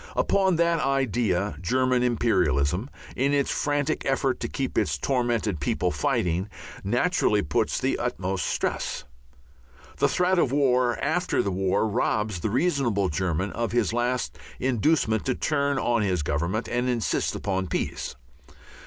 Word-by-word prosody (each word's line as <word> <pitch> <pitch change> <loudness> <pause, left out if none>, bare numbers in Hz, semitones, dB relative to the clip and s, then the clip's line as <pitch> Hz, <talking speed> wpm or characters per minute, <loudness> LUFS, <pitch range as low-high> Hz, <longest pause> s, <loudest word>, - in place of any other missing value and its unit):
Upon 190 -2 +2
that 170 0 +2
idea 120 - 0
German 130 +6 +2
imperialism, 95 - +1 0.3
in 140 +3 +1
its 140 -1 +1
frantic 145 +1 0
effort 135 -1 0
to - - -3
keep 135 -2 -3
its - - +1
tormented 120 - 0
people 70 - 0
fighting, 90 +3 0 0.3
naturally 120 - +2
puts 70 - 0
the - - 0
utmost 95 0 -2
stress. - - -2 0.9
The - - +3
threat 180 0 +2
of 130 - +2
War 125 -5 +2
after - - +1
the 100 - -1
War 95 +3 +1
robs 105 -2 0
the 105 - -2
reasonable 125 - +1
German 90 +3 -1
of 115 0 -3
his 115 -3 +1
last 120 +1 -1 0.2
inducement 125 -3 +1
to 130 - +1
turn 140 -2 0
on 120 -3 +1
his 90 -6 0
Government 85 +10 -1
and 125 +1 -1
insist 120 -3 0
upon 95 -2 -2
peace. - - -3
120 Hz, 140 wpm, -26 LUFS, 95-135 Hz, 0.9 s, The